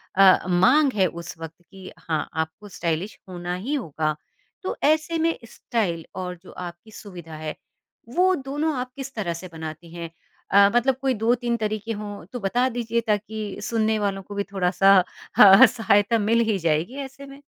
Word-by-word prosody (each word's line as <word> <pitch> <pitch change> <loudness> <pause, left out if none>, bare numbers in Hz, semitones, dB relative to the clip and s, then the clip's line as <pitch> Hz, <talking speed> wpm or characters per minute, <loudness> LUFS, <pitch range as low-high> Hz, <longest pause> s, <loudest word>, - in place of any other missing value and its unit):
अ, 190 -2 +6
माँग 255 +11 +4
है 190 -2 +3
उस 170 -1 -8
वक़्त 165 +1 -9
कि 190 -1 -11
हाँ, 155 -3 -3
आपको 160 +6 -4
स्टाइलिश 170 +3 -3
होना 175 0 -4
ही 290 - -1
होगा। 155 - -1 0.5
तो - - -3
ऐसे 310 +3 +2
में 330 +1 +1
स्टाइल 175 -8 -2
और 180 -1 -4
जो - - -13
आपकी 175 +4 -9
सुविधा 175 -7 -10
है, 155 0 -5 0.5
वो 365 +7 +3
दोनों 295 +3 -2
आप 255 0 -5
किस 275 0 -7
तरह 185 -6 -2
से 185 +2 -8
बनाती 160 +1 -8
हैं? 170 -1 -6 0.4
अ, 200 0 +7
मतलब 255 +2 +3
कोई 265 -1 +1
2-3 235 +1 0
तरीके 215 +1 -3
हों 205 -4 -6
तो 245 - -4
बता 240 +6 +1
दीजिए 235 -1 -1
ताकि 210 0 -2
सुनने 220 -1 0
वालों 195 -1 -1
को 205 +2 -9
भी 200 - 0
थोड़ा-सा 190 0 +4 0.6
सहायता 225 -1 +2
मिल 225 +3 +2
ही 205 - +2
जाएगी 165 - 0
ऐसे 270 +1 -10
में। 275 +1 -13
205 Hz, 170 wpm, -24 LUFS, 175-240 Hz, 0.6 s, अ